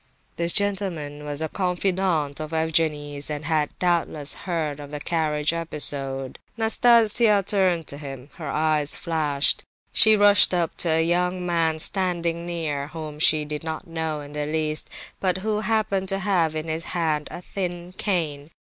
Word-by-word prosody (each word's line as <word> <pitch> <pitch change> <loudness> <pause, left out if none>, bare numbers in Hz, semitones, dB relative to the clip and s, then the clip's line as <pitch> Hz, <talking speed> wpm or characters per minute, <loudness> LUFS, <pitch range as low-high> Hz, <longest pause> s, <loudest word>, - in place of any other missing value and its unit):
This 170 0 +1
gentleman 170 -8 -1
was 145 +1 -2
a - - -1
confidant 180 -5 0
of 155 +1 -6
Evgenie's, 150 -3 0
and 150 0 -4
had 155 -2 +1
doubtless 170 -5 0
heard 160 -5 -3
of 145 -1 -9
the 150 0 -5
carriage 150 -1 0
episode. 140 -5 -2 0.2
Nastasia 225 -2 +4
turned 185 -5 +1
to 140 - -7
him. 135 -1 -9
Her 160 -4 -6
eyes 155 -1 +1
flashed; 150 -4 +1 0.3
she 220 -1 +6
rushed 205 -2 +6
up 170 -2 0
to 170 - +2
a 160 0 +3
young 180 +1 0
man 165 -2 +1
standing 170 -1 +1
near, 155 -5 -3
whom 155 -1 -8
she 155 -1 +4
did 150 +1 -4
not 160 +3 -5
know 160 -3 -3
in 145 0 -10
the 150 0 -3
least, 155 0 -1 0.3
but 185 -1 +1
who 210 +2 -1
happened 215 -3 0
to 195 - 0
have 180 -5 +1
in 155 +1 -4
his 160 +1 -2
hand 155 -3 0
a - - -7
thin 175 -2 -5
cane. 155 -8 -2
160 Hz, 160 wpm, -24 LUFS, 150-180 Hz, 0.3 s, she